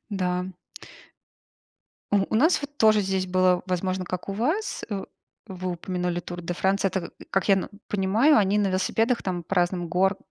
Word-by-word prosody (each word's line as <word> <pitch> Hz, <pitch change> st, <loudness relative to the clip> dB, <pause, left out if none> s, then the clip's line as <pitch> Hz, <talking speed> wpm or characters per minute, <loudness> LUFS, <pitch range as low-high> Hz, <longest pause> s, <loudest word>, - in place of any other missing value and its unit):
Да. 180 Hz, -2 st, -1 dB, 1.7 s
У -, -, +5 dB
у -, -, -1 dB
нас 315 Hz, +8 st, +4 dB
вот 285 Hz, 0 st, -8 dB
тоже 215 Hz, -4 st, +5 dB
здесь 190 Hz, -1 st, -1 dB
было, 185 Hz, -1 st, +3 dB
возможно, 185 Hz, 0 st, -1 dB
как 180 Hz, +2 st, -5 dB
у -, -, -1 dB
вас, 305 Hz, -, -1 dB
э. 200 Hz, -2 st, -3 dB, 0.4 s
Вы 185 Hz, -1 st, -4 dB
упомянули 180 Hz, 0 st, -2 dB
Тур 175 Hz, 0 st, -7 dB
де 175 Hz, 0 st, -4 dB
Франс. 195 Hz, +3 st, 0 dB
Это 190 Hz, -2 st, -1 dB, 0.2 s
как 195 Hz, +1 st, 0 dB
я 195 Hz, -, +7 dB
н 190 Hz, -, -2 dB, 0.2 s
понимаю, 210 Hz, +9 st, +3 dB
они 205 Hz, 0 st, +2 dB
на 205 Hz, -2 st, +2 dB
велосипедах 225 Hz, +6 st, +1 dB
там 180 Hz, -2 st, -2 dB
по 180 Hz, +3 st, -4 dB
разным 175 Hz, 0 st, +1 dB
гор 190 Hz, +3 st, +2 dB
190 Hz, 175 wpm, -25 LUFS, 180-205 Hz, 1.7 s, я